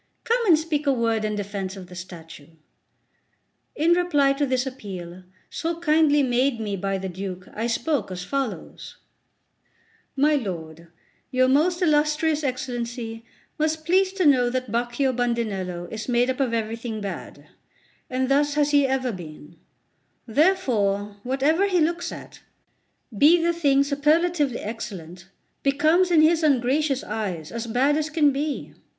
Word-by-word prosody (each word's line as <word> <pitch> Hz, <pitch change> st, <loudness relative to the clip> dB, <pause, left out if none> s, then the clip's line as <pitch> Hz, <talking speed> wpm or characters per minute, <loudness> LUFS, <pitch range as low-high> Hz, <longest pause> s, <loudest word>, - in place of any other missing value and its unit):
Come 475 Hz, +1 st, +1 dB
and 335 Hz, -4 st, +7 dB
speak 305 Hz, -2 st, -2 dB
a -, -, +5 dB
word 230 Hz, -3 st, 0 dB
in 215 Hz, 0 st, -1 dB
defence 200 Hz, -1 st, -4 dB
of 190 Hz, -, -8 dB
the 180 Hz, -, -14 dB
statue." 170 Hz, -4 st, -10 dB, 1.3 s
In 320 Hz, +3 st, +2 dB
reply 295 Hz, -6 st, +3 dB
to 285 Hz, +1 st, -1 dB
this 255 Hz, 0 st, 0 dB
appeal, 185 Hz, -8 st, -8 dB, 0.3 s
so 335 Hz, 0 st, -3 dB
kindly 305 Hz, -3 st, +3 dB
made 250 Hz, 0 st, +1 dB
me 210 Hz, -2 st, -3 dB
by 195 Hz, +1 st, -2 dB
the 190 Hz, 0 st, -4 dB
Duke, 185 Hz, 0 st, -6 dB
I 225 Hz, +2 st, -2 dB
spoke 250 Hz, 0 st, -1 dB
as 180 Hz, -1 st, -5 dB
follows: 270 Hz, +1 st, -5 dB, 1.2 s
"My 295 Hz, +3 st, +3 dB
lord, 170 Hz, -, -4 dB, 0.4 s
your 255 Hz, -1 st, +3 dB
most 335 Hz, +7 st, +2 dB
illustrious 305 Hz, 0 st, +2 dB
Excellency 240 Hz, -3 st, -4 dB, 0.4 s
must 310 Hz, 0 st, -1 dB
please 375 Hz, +3 st, +3 dB
to 380 Hz, -3 st, 0 dB
know 255 Hz, -4 st, +4 dB
that 255 Hz, -2 st, -3 dB
Baccio 240 Hz, +3 st, 0 dB
Bandinello 215 Hz, -8 st, -2 dB
is 220 Hz, +3 st, -6 dB
made 245 Hz, +1 st, +2 dB
up 255 Hz, -, -6 dB
of 265 Hz, -4 st, +1 dB
everything 225 Hz, 0 st, -3 dB
bad, 200 Hz, -2 st, -7 dB, 0.6 s
and 260 Hz, 0 st, -1 dB
thus 290 Hz, +2 st, +2 dB
has 295 Hz, -1 st, +2 dB
he 285 Hz, -2 st, +4 dB
ever 260 Hz, -1 st, 0 dB
been; 165 Hz, -4 st, -10 dB, 0.7 s
therefore, 220 Hz, -, +1 dB
whatever 280 Hz, -, +1 dB
he 365 Hz, -3 st, +2 dB
looks 340 Hz, +2 st, 0 dB
at, -, -, -10 dB, 0.8 s
be 310 Hz, -, +6 dB
the 340 Hz, +1 st, +1 dB
thing 280 Hz, -5 st, +3 dB
superlatively 295 Hz, -1 st, +1 dB
excellent, 185 Hz, -5 st, -7 dB, 0.3 s
becomes 310 Hz, +6 st, +3 dB
in 325 Hz, -3 st, +5 dB
his 325 Hz, +1 st, +4 dB
ungracious 275 Hz, 0 st, +1 dB
eyes 180 Hz, -, -4 dB
as 235 Hz, 0 st, -5 dB
bad 260 Hz, +6 st, +2 dB
as 310 Hz, 0 st, -1 dB
can 300 Hz, -2 st, +3 dB
be. 290 Hz, +2 st, -3 dB
260 Hz, 145 wpm, -24 LUFS, 215-300 Hz, 1.3 s, and